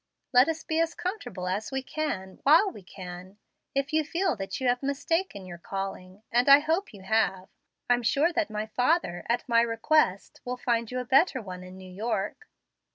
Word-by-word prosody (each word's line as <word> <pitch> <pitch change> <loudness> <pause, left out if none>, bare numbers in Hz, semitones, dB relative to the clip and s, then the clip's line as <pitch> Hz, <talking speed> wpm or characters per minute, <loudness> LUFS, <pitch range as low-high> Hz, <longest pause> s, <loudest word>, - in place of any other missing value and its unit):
Let 250 +4 +6
us 320 0 -3
be 320 0 -1
as 330 0 +1
comfortable 255 - -4
as 205 +7 -2
we 265 -1 -2
can, 200 -12 -4
while 330 +8 +5
we 210 - -11
can. 185 0 -10 0.4
If 275 +2 -1
you 315 0 +3
feel 340 +1 0
that 195 +5 -4
you 260 - -1
have 245 0 +2
mistaken 280 - -1
your 175 -2 -9
calling 195 +1 -6
and 245 +3 +3
I 280 - +11
hope 325 +7 -1
you 200 -4 -13
have 190 -3 0 0.4
I'm 245 0 +3
sure 290 +9 +2
that 330 -6 0 0.3
father, 250 - +1
at 240 +2 0
my 230 -1 +4
request, 230 -2 +1
will 250 0 -4
find 235 -2 0
you 250 - -4
a 250 - -2
better 270 +3 +4
one 185 -5 -8
in 185 +1 -11
New 190 - -11
York." 210 0 -3
245 Hz, 190 wpm, -27 LUFS, 195-300 Hz, 0.4 s, I